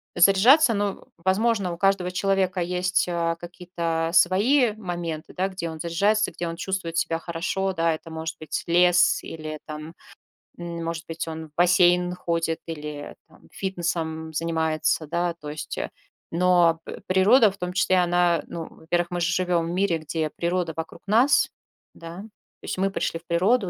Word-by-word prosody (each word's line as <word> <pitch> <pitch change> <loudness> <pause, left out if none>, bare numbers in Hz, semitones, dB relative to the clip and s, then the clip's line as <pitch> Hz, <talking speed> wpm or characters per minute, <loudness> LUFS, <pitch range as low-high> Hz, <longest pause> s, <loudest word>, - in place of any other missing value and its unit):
заряжаться. 225 - +6
Ну, 200 -1 -2
возможно, 190 +1 +1
у - - -7
каждого 195 -2 +2
человека 190 -1 0
есть, 180 +1 0
э, 170 -1 0
какие-то 170 -2 -3
свои 210 +8 +4
моменты, 175 -6 -5
да, 190 +1 0
где 185 -3 -5
он 160 - -9
заряжается, 200 +6 +1
где 170 +1 -4
он 165 - -4
чувствует 170 -2 -3
себя 165 0 +1
хорошо, 185 +3 -2
да. 165 -1 +1
Это 165 +1 -12
может 160 0 -5
быть 155 - -4
лес, 175 +1 +4
или 155 -1 -6
там, 155 +1 -8 0.6
м, 170 -1 -5
может 165 0 -4
быть, 165 0 -4
он 160 0 -6
в - - -39
бассейн 180 0 +4
ходит, 165 -2 -1
или 150 -2 -6
там - - -21
фитнесом 165 -4 -3
занимается, 160 -1 0
да. 170 +2 -1
То 150 - -7
есть, 150 0 -6
э, - - -3 0.4
но, 170 -1 +3
п - - -7
природа 205 +5 +5
в 195 - -15
том 180 -1 -4
числе, 185 0 +2
она, 175 -1 +2
ну, 165 -2 -6
во-первых, 175 +2 -2
мы 175 - -2
же 170 0 +1
живем 175 -2 +1
в - - -4
мире, 180 -2 +1
где 155 0 -2
природа 175 -1 -1
вокруг 165 +1 -7
нас, 235 +8 +4 0.4
да. 165 +1 -9
То 215 0 -19
есть - - -3
мы 195 +1 +1
пришли 165 - -2
в - - -42
природу, 190 +5 +2
175 Hz, 170 wpm, -24 LUFS, 165-185 Hz, 0.6 s, заряжаться